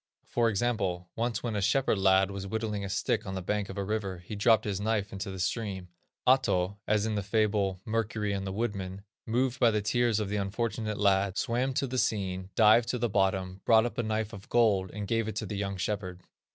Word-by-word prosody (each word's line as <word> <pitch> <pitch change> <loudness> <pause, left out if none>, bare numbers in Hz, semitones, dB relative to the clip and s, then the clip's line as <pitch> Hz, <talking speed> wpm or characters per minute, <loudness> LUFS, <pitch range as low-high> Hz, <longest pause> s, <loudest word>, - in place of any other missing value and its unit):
For 120 -1 +1
example, 100 -5 -1
once 115 0 -1
when 115 -3 -2
a 100 - 0
shepherd 105 +2 +2
lad 95 0 +4
was 100 0 -5
whittling 105 -1 -2
a 100 - -4
stick - - 0
on 95 - -4
the 95 - -3
bank 105 +2 -1
of - - -7
a 100 - -1
river, 100 -2 -2
he 90 +5 -8
dropped 110 +2 +4
his 100 -2 -2
knife 105 -2 -1
into 100 +1 -4
the 95 - -6
stream. 95 -1 -3 0.4
Ahto, 100 -7 +3
as 105 0 +2
in 110 - -1
the 105 - 0
fable, 100 -2 +1
"Mercury 110 -2 -1
and 95 -1 -3
the - - -3
Woodman," 100 -3 -3 0.2
moved 125 +2 0
by 120 - +6
the 105 -1 +1
tears 120 0 +2
of 105 - -1
the 105 - -1
unfortunate 110 +1 -2
lad, 100 -1 +2
swam 125 +3 0
to 135 - +1
the 130 0 -2
scene, 95 -4 -1
dived 115 +1 +5
to 125 - 0
the 120 0 0
bottom, 95 -1 0
brought 110 0 +5
up 120 0 -4
a - - +4
knife 110 -1 -2
of 100 -2 -10
gold, 105 -6 +3
and 105 +1 -6
gave 115 0 0
it 110 - -4
to 110 - -2
the 105 - -5
young 100 -1 -3
shepherd. 90 -1 -3
105 Hz, 225 wpm, -29 LUFS, 95-115 Hz, 0.4 s, by